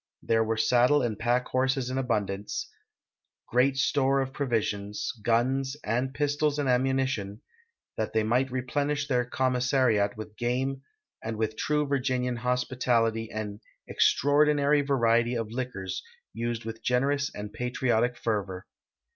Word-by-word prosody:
There 115 0 +2
were 110 0 -1
saddle 125 +5 +4
and 110 -3 -2
pack 120 +2 +1
horses 130 0 0
in 130 - -1
abundance, 105 - -2 0.8
great 130 +2 +3
store 135 0 +2
of 135 0 -2
])rovisions, 105 -6 -2
guns 130 +5 +1
and 125 +4 -1
pistols 145 +1 0
and 145 -2 0
ammunition, 130 -5 0 0.5
that - - -2
they 110 -1 +1
might 125 +5 +1
replenish 140 +3 -1
their 125 -3 +2
commissariat 125 -5 +1
with 110 0 -8
game, 130 +3 -1 0.4
and 110 0 -4
with 110 0 -1
true 150 +5 0
Virginian 125 -3 0
hospi 125 +1 -1
tality 115 -2 +2
an 105 -1 -5
" - - -46
extraordinary 145 0 +3
variety 120 -3 +2
of 115 -2 -3
liquors," 115 -7 -4 0.3
used 115 0 -3
with 115 0 -6
generous 140 +3 +1
and 105 0 -6
patriotic 125 -1 0
fervor. 100 -5 -2
125 Hz, 135 wpm, -28 LUFS, 115-135 Hz, 0.8 s, saddle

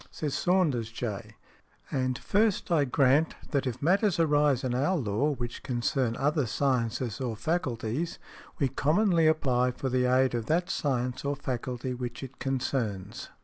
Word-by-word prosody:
Says 150 -3 -4
Saunders, 140 -7 +1
J., 110 -3 -5 0.6
"and 130 -2 0
first 210 - +1
I 155 -4 +4
grant 140 +3 +3 0.2
that 140 -2 0
if 125 +2 -4
matters 195 +3 +3
arise 145 -4 +3
in 130 -2 -1
our 145 +9 +1
law 115 +2 0
which 120 -2 -5
|110| - - -35
concern 120 -1 0
other 145 -1 +1
sciences 120 -2 -1
or 120 -4 -2
faculties 140 - -2 0.4
we 140 - +2
commonly 165 - +2
apply 130 -5 +2
for 130 +2 -3
the 125 0 +1
aid 130 0 +3
of 115 -2 -2
that 170 +3 +1
science 125 -3 -1
or 140 0 -1
faculty 125 -2 -4
which 125 0 -5
it 135 0 -9
concerns. 115 -6 -2
130 Hz, 155 wpm, -28 LUFS, 120-150 Hz, 0.6 s, I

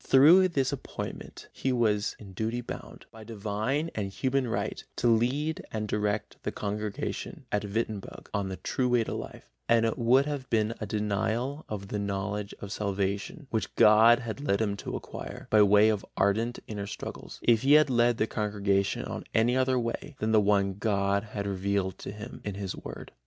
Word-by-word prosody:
Through 165 +8 +7
this 140 -7 0
appointment - - -7
he 135 - -1
was 110 -3 +1
in 100 -3 -12
duty 110 +5 -2
bound, 120 - -8
by 110 -1 -11
divine 110 +8 -2
and 100 -3 -2
human 130 +4 0
right, 115 - -2
to 120 - +1
lead 130 +7 +1
and 110 -1 -2
direct 105 0 -1
the - - -3
congregation 105 0 -4
at 105 - 0
Wittenberg 105 -1 -4
on 100 -1 -1
the 95 - -5
true 125 -1 -1
way 120 -2 +3
to - - -4
life, - - -7 0.2
and 115 -1 +5
it 115 +3 -1
would 125 +4 +4
have 145 -3 -4
been 110 0 +1
a 110 - -3
denial 110 +8 -1
of 100 -2 -5
the 105 - -2
knowledge 100 +1 -3
of 100 - -6
salvation 100 - -2
which 110 - -2
God 110 +2 +7
had 120 +2 -5
led 100 -9 +1
him 105 -2 0
to - - -5
acquire, - - -7
by 110 - +6
way 105 +1 +6
of 105 -2 0
ardent 110 +5 +1
inner 105 -2 -5
struggles, - - -7
if 115 -2 +4
he 135 +2 +4
had 150 -2 +6
led 120 -1 +3
the 110 - +2
congregation 100 -2 0
on - - -5
any 115 +3 +4
other 130 0 +2
way 120 +4 -3
than 110 +1 -1
the 110 -1 +5
one 100 -2 +2
God 100 -1 +1
had 100 -1 -5
revealed 100 -1 -1
to - - -6
him 105 +4 -9
in 105 -2 -4
His 100 -2 -4
Word. - - -9
110 Hz, 190 wpm, -28 LUFS, 100-120 Hz, 0.2 s, Through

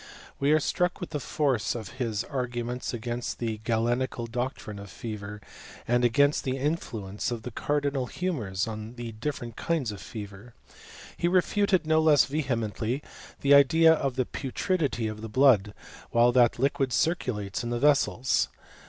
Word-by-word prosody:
We 140 +1 +2
are 155 - +5
struck 180 +3 0
with 180 - -6
the 150 - -2
force 135 -8 0
of 120 +3 -7
Ul 125 +3 -2
guments 120 +1 -4
against 120 0 -4
the 115 -2 -3
Galenical 120 +2 0
doctrine 120 -3 -4
of 100 0 -9
feven 105 -1 -6 0.5
against 120 +4 +3
the 130 0 -1
influence 115 - -2
of 120 -2 -4
the 125 - -6
cardinal 140 0 -1
humours 115 - -2
tm 110 0 -7
different 120 -3 -4
kinds 160 -9 -1
of 100 - -8
fever. 105 +1 -9 0.6
He 175 - +1
refuted 185 +1 +2
no 160 0 +3
less 155 -3 +5
vebeiBB 125 -3 -2 0.4
the 140 0 +5
Idea 160 +4 +7
of 135 -5 -1
the 130 -1 +1
putridity 140 - -1
of 110 0 -6
the 110 - -6
blood, 110 -5 +4 0.4
while 120 +1 +4
that 120 -2 +4
M 135 0 +1
circulates 120 - -1
in 120 - -3
the 120 - -1
vessels. 130 - +2
125 Hz, 150 wpm, -27 LUFS, 110-145 Hz, 0.6 s, Idea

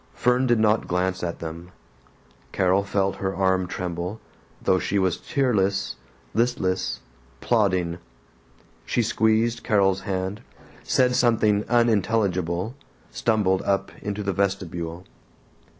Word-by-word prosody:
Fern 125 +1 +2
did 120 -1 +4
not 110 0 +2
glance 90 +1 0
at 85 -1 -3
them. 85 +2 -7 0.8
Carol 95 +1 +2
felt 100 -1 0
her 95 0 -2
arm 95 -1 +1
tremble, 90 +3 -4 0.4
though 95 - +2
she 100 - -1
was 95 -3 +1
tearless, 100 -8 0 0.4
listless, 110 -6 0 0.4
plodding. 95 -7 +1 0.8
She 120 - 0
squeezed 115 +1 +1
Carol's 95 -2 +2
hand, 95 +1 -3 0.4
said 125 -1 +2
something 110 -4 +3
unintelligible, 105 -4 +1 0.4
stumbled 100 -5 +1
up 100 0 0
into 105 0 -3
the 100 -1 -1
vestibule. 90 -3 -2
100 Hz, 110 wpm, -24 LUFS, 95-110 Hz, 0.8 s, did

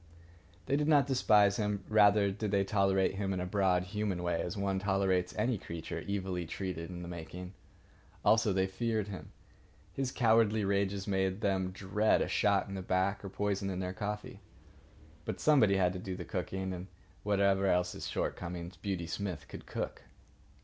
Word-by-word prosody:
They 140 - +1
did 150 +1 +1
not 145 -3 +5
despise 105 -7 +4
him. 105 -2 -1
Rather 105 -2 +5
did 105 +2 -3
they 100 -1 +2
tolerate 95 -1 +2
him 95 -1 -1
in 95 - -2
a 90 - -2
broad 90 -1 +2
human 100 -2 -2
way, 85 -1 0
as 90 - -4
one 100 -1 0
tolerates 95 -2 +1
any 110 0 +1
creature 85 -2 -6
evilly 95 -3 -2
treated 90 -2 -4
in 90 -1 -7
the - - -7
making. 90 +2 -7 0.7
Also, 110 -1 +4
they 95 0 +2
feared 110 +2 -2
him. 95 - -8 0.6
His 135 -2 -2
cowardly 110 -3 +3
rages 100 0 0
made 95 -1 0
them 95 -2 +1
dread 100 +3 +1
a - - -3
shot 100 -2 +2
in 100 - -7
the 95 - -4
back 95 +2 0
or 100 - -5
poison 100 0 -1
in 95 - -3
their 90 0 -3
coffee. 105 0 -5 0.8
But - - -4
somebody 115 -11 +4
had 90 -1 +2
to 95 - -5
do 95 0 -5
the 90 -1 -6
cooking, 95 +1 -3
and 90 +1 -6 0.3
whatever 100 -1 +2
else 90 -1 +2
his - - -6
shortcomings, 90 +1 -4
Beauty 95 -4 -3
Smith 90 -1 -4
could - - -10
cook. - - -4
95 Hz, 175 wpm, -32 LUFS, 90-105 Hz, 0.8 s, not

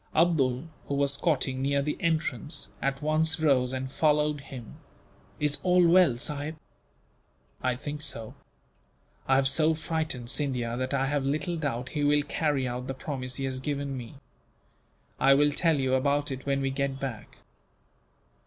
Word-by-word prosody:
Abdool, 145 -6 +3 0.2
who 140 - -1
was 140 0 +2
squatting 140 -4 0
near 140 +1 +1
the 150 - -1
entrance, 160 -4 -2
at 135 +1 -1
once 160 +2 +2
rose 135 -5 +3
and 130 0 -4
followed 150 -1 +2
him. 130 -4 -10 0.6
"Is 145 -1 +1
all 180 0 +4
well, 170 -8 +5
sahib?" 150 +4 -1 1.1
"I 125 -1 +1
think 145 +3 -6
so. 115 -7 -4 0.9
I 135 - +4
have 135 0 +4
so 155 +3 +4
frightened 155 -7 -2
Scindia 125 -6 0
that 130 +2 -2
I 135 0 +1
have 145 0 0
little 150 +5 -1
doubt 135 -6 -3
he 150 -2 -2
will 145 0 +3
carry 145 -2 0
out 125 +1 -4
the 135 - -4
promise 130 -2 -3
he 135 - -3
has 130 -1 -2
given 140 0 -3
me. 120 0 -8 1.0
I 135 +1 +6
will 145 +1 +4
tell 165 +1 +2
you 130 -1 +1
about 140 +2 +1
it, 135 +1 -6
when 140 0 +1
we 135 0 0
get 135 0 -2
back." 130 -6 -6
140 Hz, 165 wpm, -28 LUFS, 130-150 Hz, 1.1 s, I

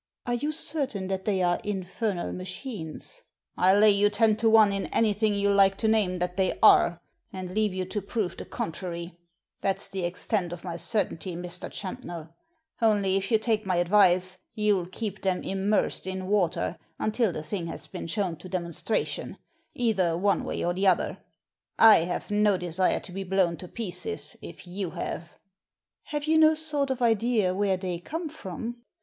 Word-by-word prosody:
"Are 240 - -1
you 290 +6 -1
certain 275 -11 -1
that 190 0 -3
they 195 -3 +1
are 175 0 +2
infernal 195 -1 -3
machines? 185 - -6 0.2
" - - -56
"I'll 190 +2 +4
lay 210 0 +7
you 205 +1 +3
ten 215 +1 +3
to 225 0 +3
one 220 -2 +6
in 195 - -2
anything 215 -1 +1
you 200 0 +2
like 195 -1 +5
to 220 - 0
name 210 -5 +2
that 180 +1 -3
they 190 -1 +1
are, 170 0 +6 0.3
and 185 -1 -6
leave 215 0 +1
you 185 0 -3
to 205 +3 -3
prove 200 -1 -2
the - - -8
contrary 170 +1 -5 0.2
— - - -53
that's 195 0 -1
the 190 -2 -3
extent 175 +1 -1
of 175 - -9
my 175 -2 -5
certainty, 185 -2 -1
Mr. 175 +1 -5
Champnell. 170 -4 -7 0.5
Only 205 -4 +3
if 195 0 -1
you 225 - +5
take 215 -1 0
my 185 - +1
advice 185 0 +4 0.2
you'll 205 -4 +1
keep 205 +1 -5
them 185 -2 0
immersed 195 0 0
in 190 0 -4
water 185 -4 0 0.2
until 215 -1 +1
the 155 - -5
thing 170 +1 -4
has - - -5
been - - -7
shown 180 -2 -2
to 185 +3 -11
demonstration, 180 +4 -2 0.4
either 195 -9 +1
one 200 +2 +1
way - - -3
or 175 - +1
the 195 +2 +1
other. 185 - +2 0.6
I 225 -1 +9
have 180 +3 -4
no 210 -1 +3
desire 180 +1 +1
to - - -10
be 195 +2 -4
blown 190 -2 +1
to 180 - -9
pieces, 230 - -4
if - - -10
you 185 +1 -4
have." 170 +1 -5 0.7
Have 295 -1 -3
you 315 +1 +3
no 315 0 +6
sort 300 -3 +2
of 260 -2 -1
idea 225 -4 +2
where 195 -1 +1
they 180 -2 -4
come 320 - -5
from?" 235 - -6
195 Hz, 180 wpm, -27 LUFS, 180-215 Hz, 0.7 s, I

